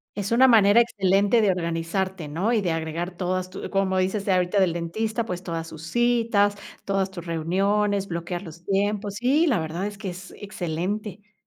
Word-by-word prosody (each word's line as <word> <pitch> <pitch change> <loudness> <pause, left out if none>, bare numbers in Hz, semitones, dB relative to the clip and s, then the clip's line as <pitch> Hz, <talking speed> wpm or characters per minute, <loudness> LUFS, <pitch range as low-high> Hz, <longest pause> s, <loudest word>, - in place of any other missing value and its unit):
Es 205 0 -3
una 255 +3 +6
manera 220 -2 +6
excelente 200 0 +3
de 210 - +3
organizarte, 175 0 -2
¿no? 180 +11 0
Y 220 - +2
de 180 -4 0
agregar 165 +2 -3
todas 185 0 -2
tu 185 - -6
como 195 -1 +1
dices 190 +2 -1
ahorita 185 +1 +2
del 185 -3 +3
dentista, 215 +7 -2
pues, 180 -4 -4
todas 165 -2 -4
sus 160 0 -9
citas, 230 -1 +2 0.3
todas 195 -1 0
tus 180 -3 -9
reuniones, 195 +5 0
bloquear 175 +1 -4
los 170 -1 -11
tiempos. 200 +1 -1
Sí, 270 +9 +2
la 245 - +2
verdad 165 +5 -3
es 205 -1 -8
que 200 -2 -5
es 180 +1 -10
excelente. 200 +2 -4
195 Hz, 180 wpm, -24 LUFS, 175-210 Hz, 0.3 s, una